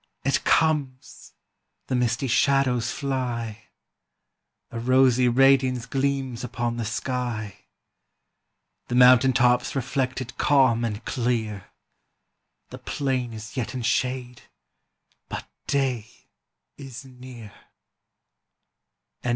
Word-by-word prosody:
it 135 0 +1
comes! 145 -5 0 0.5
the - - -4
misty 125 +1 0
shadows 130 -2 +2
fly: 120 -6 -3 1.1
A 115 - -5
rosy 130 0 +4
radiance 130 -1 +3
gleams 135 -3 -2
upon 120 0 -3
the 115 - -3
sky; 115 -2 -3 1.3
The 125 - -3
mountain 125 +1 +6
tops 125 0 +2
reflect 130 0 -1
it 125 -2 -8
calm 130 -5 +3
and 110 -1 -4
clear, 115 -6 -2 1.1
The - - -9
plain 130 -4 -2
is 110 0 -9
yet 130 0 -3
in 125 - -4
shade, 125 0 -1 0.9
but - - -5 0.2
day 130 -6 0 0.7
is 135 -1 -9
near." 125 -5 -12
125 Hz, 95 wpm, -24 LUFS, 120-135 Hz, 1.3 s, mountain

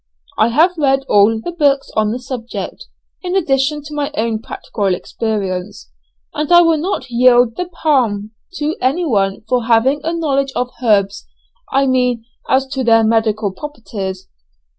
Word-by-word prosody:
I - - +5
have 320 +8 +2
read 270 -2 +2
all 210 +2 +4
the 345 - -5
books 285 -5 +1
on 215 -1 +2
the 235 - -2
subject, 250 -2 -7 0.3
in 365 0 -3
addition 295 -4 +1
to 295 +1 -9
my 295 0 -2
own 225 -4 -1
practical 200 -4 -2
experience; 185 - -4 0.4
and 300 +2 -3
I 345 0 +8
will 330 -2 +2
not 315 -6 -3
yield 245 -1 +4
the 360 - -3
palm 245 - 0 0.2
to 310 -2 -2
anyone 250 - 0
for 245 0 0
having 245 +5 +3
a 325 - -1
knowledge 275 -5 -1
of 250 0 -2
herbs 205 -4 +1 0.4
I 275 +1 +2
mean 250 -3 +1 0.2
as 265 +1 +3
to 265 -1 -2
their 225 -1 +4
medical 220 -2 +1
properties. 195 -6 -7
250 Hz, 155 wpm, -17 LUFS, 220-295 Hz, 0.4 s, I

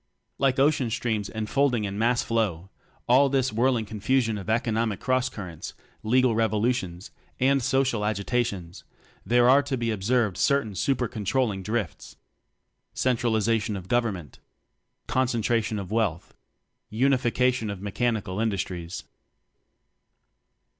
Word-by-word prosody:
Like 135 -2 +2
ocean 135 -3 +2
streams 110 -3 -2
enfolding 120 +2 0
in 100 0 -4
mass 120 +2 +2
flow 95 -6 -1 0.4
all 135 +3 +5
this 130 -3 +1
whirling 120 0 +1
confusion 110 +1 0
of 100 - -8
economic 115 -2 0
cross 130 0 +1
currents, 90 -9 -8 0.3
legal 125 +2 +3
revo 110 -1 +1
lutions, 105 -6 -2 0.3
and 135 +1 +3
social 130 -3 +1
agitations, 100 -3 -2 0.4
there 120 0 +3
are 135 +3 +6
to 140 -2 -3
be 115 -1 -1
observed 110 0 0
certain 140 -7 +1
super 125 +5 0
control 110 +4 0
ling 95 -2 -4
drifts. 105 -4 -4 0.8
Centralization 115 -3 +1
of 95 -2 -7
Government. 105 -9 -1 0.7
Concentration 115 -3 0
of 100 -1 -6
Wealth. 105 -7 -1 0.6
Unification 125 -1 +1
of 100 -2 -5
Mechanical 105 -1 -2
Industries. 95 -5 -3
115 Hz, 120 wpm, -26 LUFS, 105-125 Hz, 0.8 s, are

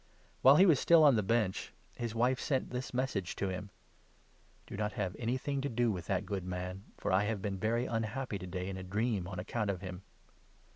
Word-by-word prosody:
While 135 +2 +8
he 185 - +7
was 160 -8 +5
still 165 -2 +6
on 145 -4 +7
the 105 - +3
Bench, 105 -2 0 0.2
his 120 -2 -4
wife 125 +3 +2
sent 135 -3 -1
this 125 +1 -4
message 125 -8 -2
to 100 - -1
him 95 +2 -5 0.3
— - - -34
" - - -33
Do - - -8
not 105 +1 -2
have 95 -6 -2
anything 130 +4 -1
to 140 - -2
do 120 0 +1
with 90 -3 -5
that 95 -2 0
good 100 -3 -3
man, 90 +2 -5
for - - -2
I 95 +2 +3
have 110 -1 -1
been 95 -1 -3
very 115 +4 +1
unhappy 115 -1 -2
to 90 - -7
day 90 +1 -4
in 95 -1 -4
a 95 - -6
dream 105 0 -1
on 95 0 -6
account 105 +3 -2
of 95 -3 -2
him." 90 -1 -6
105 Hz, 230 wpm, -33 LUFS, 95-125 Hz, 0.3 s, While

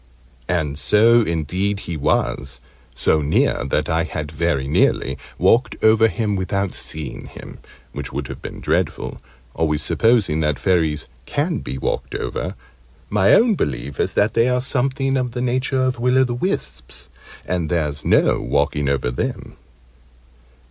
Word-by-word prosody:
And 75 -4 -1
so 115 +5 +5
indeed 95 +3 -1
he 85 - -5
was 70 -3 -1 0.4
so 80 - +2
near 75 +1 +1
that 70 - 0
I 80 +1 +1
had 75 -2 -5
very 80 -4 0
nearly 70 - +2 0.2
walked 120 +3 +3
over 110 +1 +6
him 105 +1 -1
without 100 0 -1
seeing 75 -4 -6
him; - - -11 0.3
which - - -6
would 70 -1 -4
have - - -8
been - - -8
dreadful, - - -1 0.3
always 75 -2 0
supposing 110 -9 +2
that 75 -3 0
Fairies 80 -5 +1 0.2
can 155 +3 -1
be 65 - -6
walked - - -3
over 60 - -3 0.6
my 100 -1 +4
own 230 0 +4
belief 70 - -3
is - - 0
that 105 +1 +2
they 115 +2 +3
are 125 0 +2
something 135 +1 0
of 125 -2 -2
the 125 - -3
nature 130 +2 0
of 130 -2 0
Will 125 +2 +2
o' 130 - +6
the 125 -2 -1
wisps: 65 - -4 0.4
and 85 -3 -2
there's 75 -4 -1
no - - +3
walking 75 -1 0
over 70 -3 0
them. 60 - -4
90 Hz, 155 wpm, -21 LUFS, 75-120 Hz, 0.6 s, over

